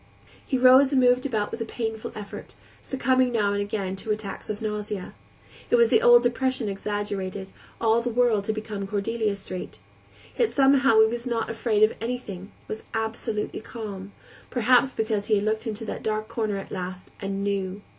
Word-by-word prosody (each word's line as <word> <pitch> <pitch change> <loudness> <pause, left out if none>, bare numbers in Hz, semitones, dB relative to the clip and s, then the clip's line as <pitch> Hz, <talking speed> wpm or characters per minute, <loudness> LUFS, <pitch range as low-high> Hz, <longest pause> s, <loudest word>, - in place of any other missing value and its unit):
He 265 - -1
rose 260 +2 +7
and 270 - +3
moved 250 +1 +4
about 215 -5 -1
with 230 - -5
a - - +1
painful 220 -1 -4
effort, 205 -1 -8 0.3
succumbing 260 -1 +1
now 210 -4 +1
and 205 - 0
again 200 -2 -3
to 205 - -8
attacks 210 -2 -4
of 210 -1 -3
nausea. 210 -3 -4 0.6
It - - +4
was 470 -1 +5
the 445 - +4
old 485 0 +7
depression 255 -1 0
exaggerated; 200 -1 -3 0.3
all 225 0 +3
the 240 - -2
world 230 -4 +2
had 215 - 0
become 210 -2 -5
Cordelia 210 +1 -1
Street. 185 -2 -7 0.6
Yet 470 -3 +2
somehow 270 -4 +5
he - - +7
was 235 +2 -4
not 230 -2 -1
afraid 220 -2 +1
of 215 - +5
anything, 220 -5 -5 0.2
was 215 - -5
absolutely 220 -1 -2
calm; 205 -4 -7 0.4
perhaps 250 +1 +4
because 220 -3 -1
he 215 - +4
had 200 - +1
looked 220 +1 -1
into 225 +1 -4
the - - -4
dark 215 0 -2
corner 220 -3 -2
at 195 - -8
last 185 -1 -6
and 195 0 -3
knew. 200 0 -2
220 Hz, 180 wpm, -25 LUFS, 205-245 Hz, 0.6 s, rose